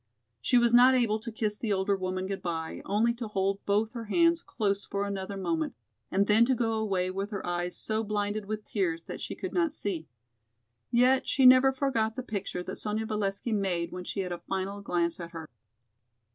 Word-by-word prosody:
She 250 - +3
was 240 -1 +4
not 250 +2 +7
able 225 -4 +2
to 230 +1 -6
kiss 215 -1 -2
the 225 - -2
older 195 0 +1
woman 185 0 -3
good 195 0 -4
by, 165 -2 -4
only 220 +4 +2
to 235 -1 -5
hold 195 -1 -1
both 210 +3 +1
her 230 -2 -5
hands 335 +8 +3
close 200 -3 -1
for 200 0 -2
another 195 0 -4
moment 165 -7 -1 0.3
and 195 +1 +2
then 215 +2 +5
to 260 +1 +2
go 225 -2 0
away 190 -4 0
with 195 +2 -3
her 200 -3 -5
eyes 175 0 -2
so 220 0 -1
blinded 205 0 -2
with 215 +1 -4
tears 170 -6 -1
that - - -7
she - - -4
could - - -5
not 335 -3 +2
see. 190 - -1 0.8
Yet 250 +2 +3
she 270 - +3
never 255 +1 +8
forgot 245 -5 0
the 255 - -4
picture 200 -5 -4
that - - -6
Sonya 215 +1 -2
Valesky 210 +1 -2
made 180 -5 -1
when 180 0 -6
she 195 - -3
had 180 -1 -4
a 175 - -4
final 195 +3 -4
glance 170 -3 -1
at 170 0 -7
her. 160 -1 -7
205 Hz, 205 wpm, -29 LUFS, 190-230 Hz, 0.8 s, never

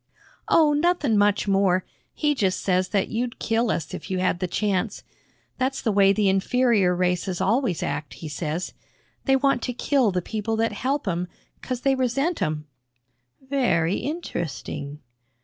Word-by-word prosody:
"Oh, 305 -2 +5
nothin' 295 -5 +2
much 205 0 +2
more. 195 -2 +2 0.3
He 300 -1 +1
just 195 -9 0
says 185 -1 +1
that 200 -2 0
you'd 235 +1 -2
kill 230 +1 0
us 160 -7 -2
if - - -7
you 190 - -1
had 185 -1 +1
th' 185 - -1
chance. 205 +2 -1 0.6
That's 265 +1 0
the 225 - 0
way 195 -1 +5
the 205 0 +2
inferior 195 -1 +3
races 180 0 0
always 225 - +1
act, 145 0 -4
he 160 - -8
says. 155 +3 -3 0.5
They 270 - +4
want 275 -2 +2
to 250 - -3
kill 250 -2 +2
th' 180 -1 -1
people 220 0 -2
that 225 0 +1
help 265 +4 -2
'em, 180 -1 -1 0.3
'cause 255 -1 -4
they 275 +1 +3
resent 270 +6 0
'em." 155 0 -1 0.8
"Very 195 -11 +1
interesting." 155 - -5
205 Hz, 160 wpm, -24 LUFS, 180-255 Hz, 0.8 s, Oh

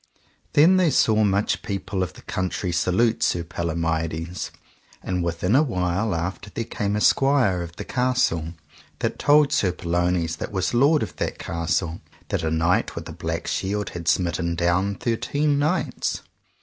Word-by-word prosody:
Then 170 +6 +6
they 180 -3 +4
saw 110 -6 +3
much 100 0 +1
people 100 -1 -3
of 90 - -2
the - - -15
country 95 0 -2
salute 105 +7 +1
Sir 85 -6 +1
Palomides. 80 0 -2 0.5
And 90 -1 -1
within 85 +5 0
a 140 - +6
while 95 - 0
after 90 +5 -4
there 115 - -3
came 105 -2 -2
a - - +1
squire 130 -11 +3
of 85 0 -7
the - - -6
castle, 125 - 0 0.4
that - - -2
told 145 0 +5
Sir 95 - +2
Pellounes 85 -1 -1
that - - -5
was 95 +1 -1
lord 145 +6 +4
of - - -7
that - - -2
castle, 85 0 -2 0.3
that - - -1
a 80 - -1
knight 80 +3 +1
with - - -6
a - - -7
black - - -4
shield 100 +1 -2
had 85 -1 -7
smitten 85 -1 +1
down 90 +4 +1
thirteen 140 +7 0
knights. 155 +6 -1
95 Hz, 160 wpm, -24 LUFS, 85-115 Hz, 0.5 s, Then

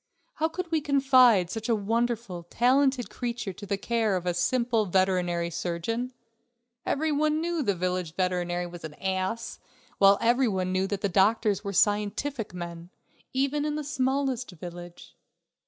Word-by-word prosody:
How 320 - +2
could 345 +1 -5
we 320 -2 +2
confide 255 - +4
such 225 +1 -4
a 230 - +4
wonderful, 220 -4 -2
talented 260 +1 +2
creature 235 -5 -4
to 205 +3 -10
the 200 0 -1
care 220 -1 0
of 180 -1 -3
a 180 - +1
simple 235 +4 +1
veterinary 180 -2 +1
surgeon? 205 +10 -3 0.8
Every 310 +2 0
one 305 +1 +1
knew 340 +1 -2
that 260 -10 +1
the - - -3
village 180 -2 -2
veterinary 180 -1 -1
was 175 0 -9
an 155 -2 -7
ass, 190 +5 -3 0.4
while 195 0 +7
every 245 +2 +3
one 185 -3 -1
knew 185 +1 +1
that 200 -2 -2
doctors 210 0 +3
were 200 - -3
scientific 210 +6 0
men, 170 -1 -7 0.4
even 275 +2 0
in 300 0 -1
the 305 - -3
smallest 265 -2 -1
village. 175 0 -10
210 Hz, 155 wpm, -27 LUFS, 180-255 Hz, 0.8 s, while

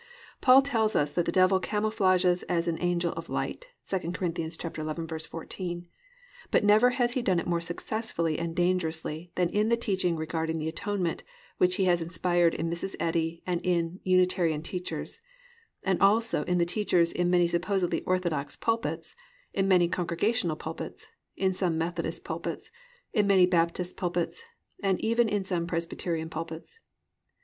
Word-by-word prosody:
Paul 265 +1 +7
tells 225 -6 +1
us 145 0 +1
that 175 - +1
the - - +2
Devil 185 0 +4
camouflages 190 -4 +2
as 170 -1 +1
an 165 -1 -1
angel 175 -1 +1
of 165 - -7
light - - -3 0.3
(II 190 - +2
Cor. 170 - -5 0.2
11:14), 165 +2 -5 0.6
but - - +3
never 210 +4 +6
has 245 -1 +1
he 255 - 0
done 185 -7 +2
it - - -4
more 170 -1 0
successfully 170 -2 -2
and 165 -1 -3
dangerously 170 -2 -1
than 180 -1 +2
in 210 +2 +2
the 235 - +3
teaching 190 -7 0
regarding 160 0 -2
the 155 0 -3
Atonement 180 +1 -2 0.4
which 180 0 +4
he 195 -1 +1
has 175 -2 +3
inspired 170 0 +2
in 165 - -2
Mrs. 170 +3 -3
Eddy 165 0 -1
and 175 -1 -1
in 175 0 0
Unitarian 180 -4 +2
teachers, 180 - -5 0.6
and 190 -2 0
also 220 -2 +4
in 180 - +1
the 170 - +3
teachers 175 -2 +2
in 175 0 0
many 175 -1 +4
supposedly 175 +1 0
orthodox 170 -6 -1
pulpits, 230 +1 -2 0.4
in 195 -1 +1
many 180 -2 +5
Congregational 175 +1 0
pulpits, 160 +1 -7 0.3
in 190 -1 +1
some 180 -3 0
Methodist 165 0 -3
pulpits, 165 +1 -5 0.4
in 210 -4 +3
many 190 -2 +6
Baptist 175 0 0
pulpits, 175 - -2 0.4
and 195 -3 +1
even 230 0 +2
in 205 -2 -1
some 175 -3 -1
Presbyterian 165 -1 -2
pulpits. 165 - -7
175 Hz, 155 wpm, -28 LUFS, 165-195 Hz, 0.6 s, Paul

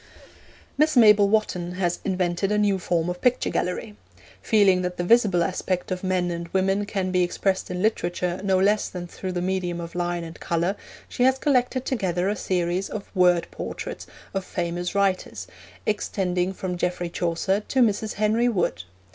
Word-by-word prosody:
Miss 305 -2 +3
Mabel 210 -3 +7
Wotton 180 -5 0
has 175 -1 -1
invented 185 0 0
a 210 - +2
new 205 -2 +2
form 170 -2 0
of 180 0 -4
picture 250 0 +2
gallery. 175 - -2 0.5
Feeling 195 - +4
that 180 0 -3
the 175 - -1
visible 195 -4 +4
aspect 185 +1 -2
of 185 0 -3
men 185 -2 0
and 170 0 -4
women 195 +3 0
can 190 -2 -2
be 180 0 +2
expressed 190 +2 0
in 180 +1 -3
literature 180 -4 -1
no 190 -1 +2
less 205 +3 +2
than 180 -1 -6
through 185 +1 -6
the 175 0 -2
medium 180 -2 -1
of 170 0 -7
line 175 -1 -2
and 165 0 -9
colour, 170 +4 0 0.3
she - - -6
has 260 +1 +4
collected 255 -2 +1
together 190 -6 0
a 210 - 0
series 180 -1 -1
of 210 -1 -7
Word 180 -2 +4
Portraits - - -6 0.3
of 195 -1 -2
Famous 175 +1 -3
Writers 195 -2 0 0.4
extending 185 -3 -1
from 185 -2 -4
Geoffrey 175 0 -2
Chaucer 175 +4 0
to 265 - +1
Mrs. 215 0 0
Henry 220 +4 +2
Wood. 175 - 0
185 Hz, 170 wpm, -24 LUFS, 175-205 Hz, 0.5 s, Mabel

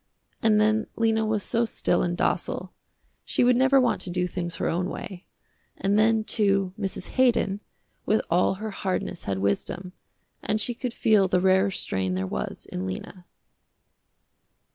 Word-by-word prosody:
And 215 -1 +4
then 215 +1 +2
Lena 225 -1 +2
was 215 -2 0
so 235 - +1
still 230 - +1
and 175 0 -1
docile, - - -1 0.5
she - - +1
would 245 0 +5
never 265 +2 +4
want 250 -2 +1
to - - -3
do 180 0 0
things 175 -1 -4
her - - -2
own 180 +2 -1
way. 185 -2 -8 0.5
And 200 +1 +1
then, 220 0 +3
too, 195 -4 +1
Mrs. 195 -2 -4
Haydon, 235 -6 +2 0.4
with 215 +1 +1
all 180 +3 +2
her 215 +2 -5
hardness 185 -2 -3
had 95 -1 -1
wisdom, 100 - -2 0.5
and 215 - 0
she 240 +3 0
could 245 +1 -4
feel 210 -4 +4
the 180 -1 +2
rarer 190 +1 +3
strain 95 - -2
there 95 +1 -1
was 65 -8 -5
in 95 +1 -5
Lena. 175 - -7
195 Hz, 165 wpm, -26 LUFS, 180-220 Hz, 0.5 s, would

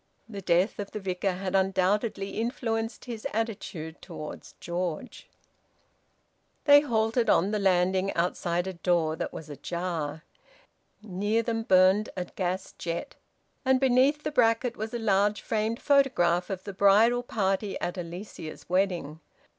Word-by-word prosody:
The 205 -3 -7
death 180 +4 +2
of 200 - -4
the 215 - -5
Vicar 190 0 -1
had 185 +1 -4
undoubtedly 195 +2 +1
influenced 225 -1 -2
his 235 0 -5
attitude 200 -8 -4
towards 160 -4 -9
George. 175 +5 -4 1.4
They 285 0 +8
halted 225 -3 +1
on 190 +5 +3
the 210 - 0
landing, 190 0 +2
outside 175 0 0
a 190 - -4
door 170 -3 +1
that - - -4
was 160 - -8
ajar. 160 +1 -4 0.8
Near 205 +3 0
them 225 0 -1
burned 190 0 +4
a 180 - -2
gas 185 +1 -3
jet, 170 0 -4 0.5
and 260 -1 +3
beneath 265 +3 +3
the - - -2
bracket 235 -2 +2
was 220 +1 -5
a - - 0
large 205 -2 +2
framed 220 +1 -1
photograph 215 - +3
of 190 -2 -4
the 200 - -7
bridal 210 +5 +5
party 200 -3 -1
at 175 - -3
Alicia's 175 -2 -8
wedding. 175 -5 0
195 Hz, 140 wpm, -28 LUFS, 180-225 Hz, 1.4 s, They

